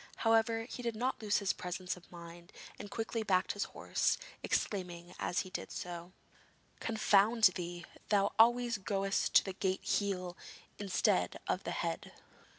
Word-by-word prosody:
However, 225 0 +4
he 250 - -6
did 235 -2 -2
not 250 +3 -1
lose 210 -1 +2
his 200 -2 +1
presence 180 0 -4
of 180 - -17
mind, 170 +1 -11 0.3
and 205 - -7
quickly 225 +2 -2
backed 185 -4 +2
his 205 - -2
horse, - - 0 0.2
exclaiming 180 -3 -2
as 175 - 0
he 185 - -9
did - - -5
so: 175 0 -6 0.7
'Confound 220 0 +3
thee! 175 -1 -5 0.2
thou 200 -1 +3
always 240 0 +5
goest 195 0 0
to - - +8
the 190 - -4
gate 190 0 -1
heel 190 -3 -1 0.4
instead 185 - +1
of - - -1
the - - -2
head.' - - -3
195 Hz, 155 wpm, -34 LUFS, 180-220 Hz, 0.7 s, to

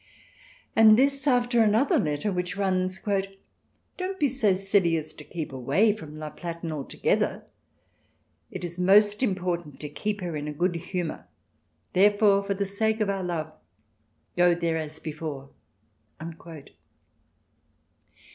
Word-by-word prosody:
And 220 -1 +7
this 275 +2 +2
after 245 -2 +3
another 220 +5 +3
letter, 150 +6 -1
which 180 0 -3
runs: 185 -1 0 0.5
" - - -45
Don't 380 +1 -4
be 290 - +3
so 220 -7 +2
silly 195 -3 +2
as 155 -1 -5
to 150 - -12
keep 155 -3 -6
away 150 - +2
from 155 -8 -10
La 155 -1 -6
Platen 170 -1 -6
altogether.... 145 -3 -1 1.1
It 185 - -7
is 175 0 -4
most 205 +3 +4
important 180 - -2
to 150 - -6
keep 205 +7 -3
her 175 -3 -4
in 150 0 -4
a 150 - -4
good 175 +4 0
humour; 175 -1 -5 0.7
therefore, 205 +1 +4
for 200 0 -2
the 200 +1 -1
sake 220 +3 -1
of 210 -2 +1
our 195 -1 -3
love, 160 -3 -3 0.8
go 175 -1 +4
there 170 -1 -1
as 155 -1 -4
before." 150 -3 -6
185 Hz, 135 wpm, -26 LUFS, 160-210 Hz, 1.1 s, And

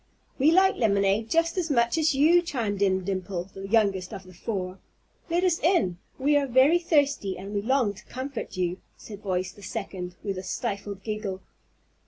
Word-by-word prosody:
"We 280 +4 +5
like 380 +3 +4
lemonade 200 0 +2
just 330 +2 +2
as 340 -2 -2
much 235 -2 +2
as 315 -3 +2
you," 325 +6 +5
chimed 225 - -3
in 190 -1 +2
Dimple, 190 -1 -3
the 195 0 -7
youngest 195 -4 +2
of 190 - -7
the 185 0 -15
four. 185 0 -4 0.5
"Let 345 +2 +1
us 355 -3 +2
in. 195 - +2 0.2
We 290 +3 +2
are 280 -1 +1
very 265 +7 +5
thirsty, 285 - +1
and 195 +3 -7
we 205 - 0
long 245 -2 +1
to 195 - -15
comfort 260 -6 -6
you," 180 0 -1 0.2
said 205 -2 -10
voice 185 -2 -2
the 205 - -16
second, 190 -3 -5
with 195 -3 -3
a - - -7
stifled 200 +1 -4
giggle. 210 -3 -4
210 Hz, 185 wpm, -26 LUFS, 190-280 Hz, 0.5 s, We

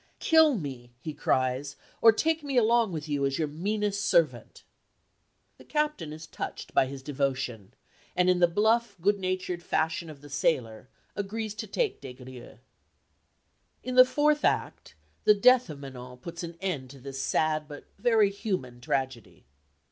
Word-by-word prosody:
"Kill 320 -3 +5
me," 125 -7 -7
he 155 +4 -6
cries, 130 +1 0 0.3
"or 225 - +9
take 320 +8 0
me 275 -3 -2
along 230 -2 +4
with 155 -2 -5
you 145 -2 -1
as 135 0 0
your 155 - 0
meanest 205 +6 -2
servant." - - +1 1.0
The - - -13
captain 300 - -1
is 155 +1 -8
touched - - -7
by 130 - +4
his 135 0 -8
devotion, 135 -7 -3 0.4
and 180 0 +3
in 180 -1 +3
the 175 - +6
bluff, 220 +4 +2
good 200 +4 +2
natured 185 -1 -2
fashion 160 0 -1
of 145 -3 -11
the 145 - -12
sailor, 125 -5 -1 0.3
agrees 210 +1 -3
to - - -6
take 470 -5 -1
Des 130 -2 -8
Grieux. 125 -1 -12 1.3
In 255 - -4
the 255 0 +9
fourth 295 +3 +1
act - - -1 0.3
the 210 - +7
death 250 +2 +5
of 150 - -7
Manon 125 -2 -9
puts 170 +6 -8
an 170 -1 -7
end 155 -10 -3
to 135 +1 -12
this 135 +1 -6
sad 155 0 0
but 145 -1 -10
very 220 -2 +4
human 180 - -4
tragedy. 130 - -3
165 Hz, 165 wpm, -28 LUFS, 135-215 Hz, 1.3 s, or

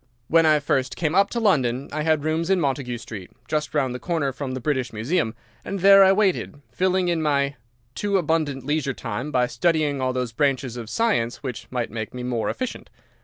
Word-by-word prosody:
"When 165 0 +5
I 155 -1 +5
first 135 -3 0
came 160 -3 -1
up 195 +2 +4
to 235 - -2
London 135 - +1
I 155 - -2
had 155 -1 +1
rooms 160 +2 -1
in 190 -1 +3
Montague 135 -5 -1
Street, 110 -5 -9 0.2
just 150 0 -2
round 135 -4 +1
the 125 - -5
corner 150 -2 -1
from 135 -1 -5
the - - -3
British 130 -2 -1
Museum, 115 +2 -1 0.3
and 200 -2 -4
there 195 +1 +8
I 190 - +6
waited, 195 -7 +1
filling 185 0 +1
in 170 -2 +1
my 140 -2 +1 0.4
too 200 +4 0
abundant 150 -6 -1
leisure 145 -2 -1
time 115 +7 -4
by 125 -3 +3
studying 155 -1 0
all 130 0 +1
those 125 -2 -2
branches 135 -2 0
of 115 -3 -7
science 200 - 0
which 120 -4 -5
might 125 -2 -3
make 110 +1 -5
me 125 - -5
more 120 -3 -1
efficient. 255 -2 -5
145 Hz, 205 wpm, -23 LUFS, 125-165 Hz, 0.4 s, there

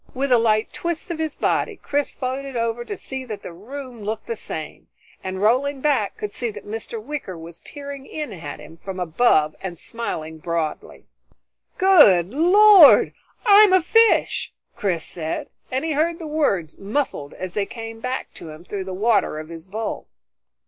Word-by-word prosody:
With 270 +1 -1
a 245 - +6
light 220 -1 +1
twist 340 0 -3
of 325 - -4
his 315 -2 -2
body 435 - 0
Chris 290 -6 -2
floated 265 +1 -4
over, 230 +1 -1
to 410 - -6
see 265 -5 -6
that 215 -4 -7
the 175 - -8
room 250 +5 -9
looked 215 +2 -4
the 230 - -3
same, 155 -7 -7 0.4
and 190 +1 -4
rolling 265 +6 +2
back, 260 -8 0
could 210 - -4
see 240 +2 -2
that 215 - -9
Mr. 225 +2 -5
Wicker 235 - -6
was 165 +1 -11
peering 280 -2 -9
in 300 -8 -5
at 160 -5 -7
him 165 - -13
from 190 +2 -7
above 160 -3 +2
and 180 -3 -5
smiling 160 -8 -4
broadly. 165 -1 -4 0.7
"Good 235 - +6
Lord 370 +2 +7 0.3
I'm 410 -2 +7
a 375 - +6
fish!" 455 +5 +3 0.2
Chris 180 -5 -1
said, 170 - -4 0.2
and 260 +4 -2
he 325 - -1
heard 325 +3 +1
the 330 - -8
words 240 - -1
muffled 200 - -3
as 185 -1 -6
they 200 -2 -1
came 225 -1 -8
back 255 +2 -4
to 165 - -8
him 155 +3 -11
through 195 0 -5
the 190 -1 -5
water 215 -5 +2
of 155 +1 -7
his 165 +1 -10
bowl. 220 +3 -4
230 Hz, 175 wpm, -22 LUFS, 185-285 Hz, 0.7 s, Lord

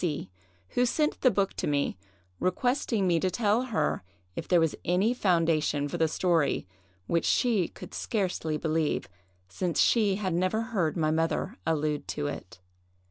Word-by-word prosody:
C——, 145 - -2 0.4
who 245 0 +2
sent 300 +5 0
the 255 - +6
book 200 -4 0
to - - -1
me, 140 -7 0 0.4
requesting 230 +1 0
me 170 -2 +3
to 185 - +1
tell 215 +5 +1
her 160 -12 0 0.3
if - - -5
there 175 - +4
was 165 -2 +2
any 190 +7 +2
foundation 165 - +1
for 170 +4 -4
the 160 - +4
story, 165 - +1 0.4
which 170 - +1
she 220 -9 +2
could - - -11
scarcely 180 -7 -1
believe, 155 0 0 0.4
since 170 - -2
she 210 -5 +4
had 190 -3 -2
never 185 +5 +1
heard 175 -5 +1
my 155 -2 +2
mother 165 +6 0
allude 150 -2 0
to 145 - -3
it. 145 -11 -6
175 Hz, 160 wpm, -28 LUFS, 155-205 Hz, 0.4 s, the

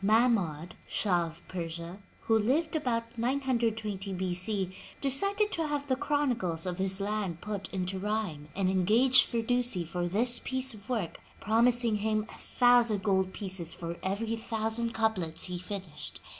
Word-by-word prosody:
Mahmoud, 195 -7 +2
Shah 175 -5 +1
of 165 +2 -13
Persia, 170 +1 -5 0.2
who 225 - +2
lived 300 +10 +1
about 230 -5 -2
920 225 -6 -1
B. 185 -1 -2
C, 185 0 -1 0.2
decided 395 +10 +2
to 325 -2 0
have 290 -1 -2
the 265 -2 +1
chronicles 245 - 0
of 180 0 -3
his 190 0 +1
land 200 -4 -2
put 200 -1 -5
into 190 0 -2
rhyme, 200 -8 -2
and 190 -1 +1
engaged 215 +8 +5
Firdusi 235 -5 0
for 175 +2 -2
this 235 +7 +2
piece 260 0 0
of 210 +1 -13
work, 220 -9 -2 0.2
promising 230 +1 +3
him 215 0 0
a - - -10
thousand 240 -5 +3
gold 190 -2 +2
pieces 190 -4 -2
for 170 0 -5
every 220 +4 -1
thousand 225 0 -1
couplets 190 -8 +1
he 180 -1 -3
finished. 185 -4 -6
210 Hz, 150 wpm, -30 LUFS, 185-240 Hz, 0.2 s, engaged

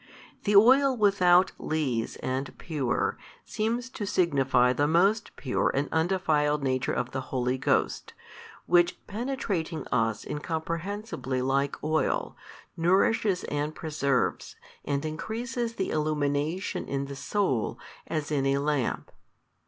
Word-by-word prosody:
The 205 0 +2
oil 260 +5 +6
without 185 -4 +4
lees 130 -8 -1
and 130 +2 -3
pure, 145 -7 -1 0.3
seems 235 +3 -2
to 205 - -5
signify 135 -9 +3
the 145 +2 +1
most 195 +7 +2
pure 130 - 0
and 140 +2 0
undefiled 160 -4 +1
Nature 130 -1 0
of 125 0 -2
the 130 - -3
Holy 125 0 -1
Ghost, - - 0 0.5
Which 175 0 +2
penetrating 205 - -3
us 115 -2 0
incomprehensibly 160 - -3
like 135 +1 0
oil, 155 +1 0 0.4
nourishes 190 +3 +2
and 150 +1 -3
preserves 140 -5 -1 0.3
and 140 +1 -2
increases 230 +8 -3
the 190 - -2
illumination 150 +3 -1
in 140 0 -2
the 140 0 -7
soul, 135 - -1 0.3
as 155 -2 -3
in 135 -2 +1
a 135 0 +2
lamp. 140 -3 -1
155 Hz, 120 wpm, -27 LUFS, 140-195 Hz, 0.5 s, oil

